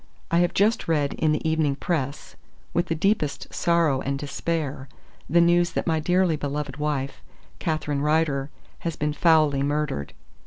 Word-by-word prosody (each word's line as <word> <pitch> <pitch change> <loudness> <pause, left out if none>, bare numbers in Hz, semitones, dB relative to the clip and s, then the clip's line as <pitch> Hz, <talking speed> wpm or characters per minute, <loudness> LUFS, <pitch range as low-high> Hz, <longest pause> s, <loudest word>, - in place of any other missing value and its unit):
"I 170 - +4
have 175 0 +1
just 215 +4 +2
read 150 -4 +1
in 155 - +1
the 155 +1 -1
Evening 160 -3 +1
Press, 140 -3 -3 0.4
with 175 +1 +1
the 165 - -1
deepest 160 -4 -1
sorrow 165 -6 +2
and 140 +1 -2
despair, 145 -1 -3 0.4
the 170 +4 +4
news 175 0 +3
that - - -1
my 160 -2 +1
dearly 180 +1 +2
Beloved 145 -1 -4
wife, 145 -2 -2 0.4
Catherine 155 -3 -1
Rider, 150 -2 +1 0.3
has 165 -2 -3
been 150 0 -1
foully 155 -3 +3
murdered. 145 - -2
150 Hz, 155 wpm, -25 LUFS, 140-170 Hz, 0.4 s, I